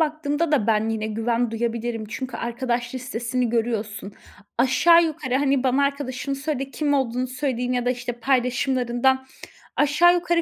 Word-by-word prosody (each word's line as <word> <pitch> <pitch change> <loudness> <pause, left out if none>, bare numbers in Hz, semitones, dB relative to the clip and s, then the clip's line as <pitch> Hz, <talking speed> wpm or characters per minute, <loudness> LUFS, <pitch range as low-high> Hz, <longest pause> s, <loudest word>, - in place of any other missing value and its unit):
baktığımda 310 0 0
da 235 -8 +2
ben 220 0 +2
yine 220 -1 -2
güven 230 +2 0
duyabilirim. 230 0 -2
Çünkü 260 +4 -5
arkadaş 240 0 -2
listesini 250 -1 -2
görüyorsun. 220 -3 -2 0.5
Aşağı 335 +7 +5
yukarı, 275 -5 -3
hani, 275 -1 +2
bana 265 +2 +3
arkadaşını 280 -1 -2
söyle 275 -2 -3
kim 290 0 0
olduğunu 255 -2 0
söyleyeyim 255 -1 -2
ya 245 -1 0
da, - - +3
işte, 245 -1 -3
paylaşımlarından 255 +1 +1 0.5
aşağı 300 +5 +5
yukarı 345 -1 +1
255 Hz, 145 wpm, -23 LUFS, 235-280 Hz, 0.5 s, Aşağı